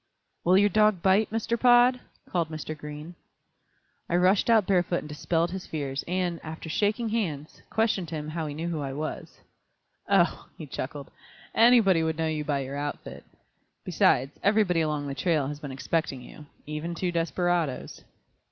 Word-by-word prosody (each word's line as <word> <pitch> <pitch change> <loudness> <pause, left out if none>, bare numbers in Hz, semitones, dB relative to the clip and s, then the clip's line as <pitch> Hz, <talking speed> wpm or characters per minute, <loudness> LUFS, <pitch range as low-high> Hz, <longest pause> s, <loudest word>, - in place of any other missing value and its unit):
"Will 180 +2 +5
your 205 +1 +5
dog 210 -3 +3
bite, 195 +3 +3
Mr. 225 +1 -1
Pod?" 245 +1 +5 0.3
called 170 -3 -1
Mr. 155 0 -5
Green. 150 +2 -8 1.0
I 170 - +1
rushed 185 +5 +3
out 220 -4 +5
barefoot 180 -2 +1
and - - -9
dispelled 165 +3 -1
his 190 0 -6
fears, 140 -3 -3
and, 180 -1 -1
after 160 +1 -7
shaking 215 +6 0
hands, 165 -10 -3
questioned 210 -6 0
him 150 -1 -5
how 160 0 -3
he 145 - -6
knew 165 +3 -4
who 165 -3 -2
I 135 -1 -4
was. 155 +3 -6 0.7
"Oh," - - +2
he - - -7
chuckled, - - -6 0.4
"anybody 225 -7 +5
would 160 0 -1
know 165 - 0
you 155 -1 -1
by 145 -2 -1
your 135 +1 -5
outfit; 145 0 -6 0.6
besides, 135 +3 +2
everybody 200 -4 +3
along 150 -2 -1
the 140 - -4
trail 145 0 0
has 145 0 -6
been 145 -2 -7
expecting 135 -1 -2
you, 150 +4 -13 0.2
even 150 +3 -4
two 180 +1 -1
desperadoes." 170 -3 -1
165 Hz, 165 wpm, -27 LUFS, 150-190 Hz, 1.0 s, Will